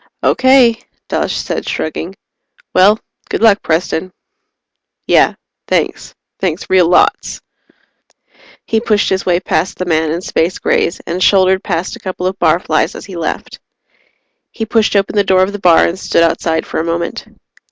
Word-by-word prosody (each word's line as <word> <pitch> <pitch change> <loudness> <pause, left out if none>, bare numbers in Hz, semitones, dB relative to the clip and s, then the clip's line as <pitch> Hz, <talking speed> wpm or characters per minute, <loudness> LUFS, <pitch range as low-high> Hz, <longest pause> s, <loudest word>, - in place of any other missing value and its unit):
"Okay," 260 -3 +4 0.3
Dawes - - -1
said, - - -4
shrugging. 165 +4 -4 0.6
"Well 200 +4 +5 0.3
good - - -2
luck, 220 -2 +5
Preston." 170 +2 -1 0.9
"Yeah. - - +3 0.3
Thanks. - - -2 0.2
Thanks 180 -3 -2
real 185 -2 +5
lots." 180 - +2 1.3
He 225 - 0
pushed 215 -2 +1
his 190 0 -1
way 175 -1 +2
past 180 -1 -2
the 185 - -3
man 160 -2 0
in 170 +2 -2
Space 175 -1 -1
Grays 170 - 0
and 175 +2 -4
shouldered 190 0 +3
past 175 -1 -3
a - - -13
couple 185 -1 -5
of 190 +1 -2
barflies 170 +2 +1
as - - -9
he 195 - -10
left. 165 -1 -5 0.9
He 225 - -4
pushed 220 -1 +1
open 200 +1 +1
the 205 - +3
door 185 -1 +3
of 190 - -1
the 205 - -6
bar 175 -3 +5
and 180 +3 -3
stood 170 - +1
outside 165 -1 0
for - - -4
a - - -1
moment. 170 0 -3
185 Hz, 160 wpm, -15 LUFS, 170-200 Hz, 1.3 s, Well